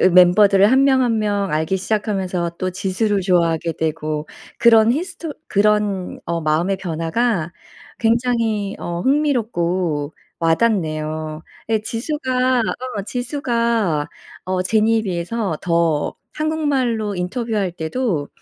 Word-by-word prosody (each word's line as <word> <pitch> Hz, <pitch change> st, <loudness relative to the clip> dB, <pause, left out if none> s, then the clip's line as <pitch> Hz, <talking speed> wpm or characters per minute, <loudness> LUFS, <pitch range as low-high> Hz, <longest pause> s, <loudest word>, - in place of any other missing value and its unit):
으 -, -, +4 dB
멤버들을 190 Hz, +3 st, +6 dB
1 265 Hz, +1 st, +5 dB
명 265 Hz, -1 st, +4 dB
1 230 Hz, -3 st, +1 dB
명 205 Hz, -2 st, 0 dB
알기 155 Hz, +5 st, 0 dB
시작하면서 190 Hz, -4 st, -1 dB
또 185 Hz, 0 st, -1 dB
지수를 195 Hz, +2 st, 0 dB
좋아하게 170 Hz, -2 st, +1 dB
되고 155 Hz, -1 st, -3 dB, 0.3 s
그런 225 Hz, 0 st, +6 dB
히스토 335 Hz, 0 st, -4 dB, 0.2 s
그런 205 Hz, -2 st, +1 dB
어 170 Hz, 0 st, -1 dB
마음의 165 Hz, +5 st, +1 dB
변화가 175 Hz, +1 st, -1 dB, 0.5 s
굉장히 225 Hz, -3 st, 0 dB
어 170 Hz, 0 st, -4 dB
흥미롭고 185 Hz, -, 0 dB, 0.3 s
와닿네요. 155 Hz, -4 st, 0 dB, 0.3 s
예 220 Hz, -1 st, +2 dB
지수가 255 Hz, +1 st, 0 dB, 0.4 s
어 200 Hz, -, -2 dB
지수가 235 Hz, -, -1 dB, 0.4 s
어 185 Hz, 0 st, -1 dB
제니에 220 Hz, +3 st, +2 dB
비해서 185 Hz, -1 st, -2 dB
더 170 Hz, -3 st, +1 dB, 0.2 s
한국말로 270 Hz, -9 st, 0 dB
인터뷰할 200 Hz, 0 st, -2 dB
때도 165 Hz, -, -2 dB
200 Hz, 250 characters per minute, -20 LUFS, 170-235 Hz, 0.5 s, 멤버들을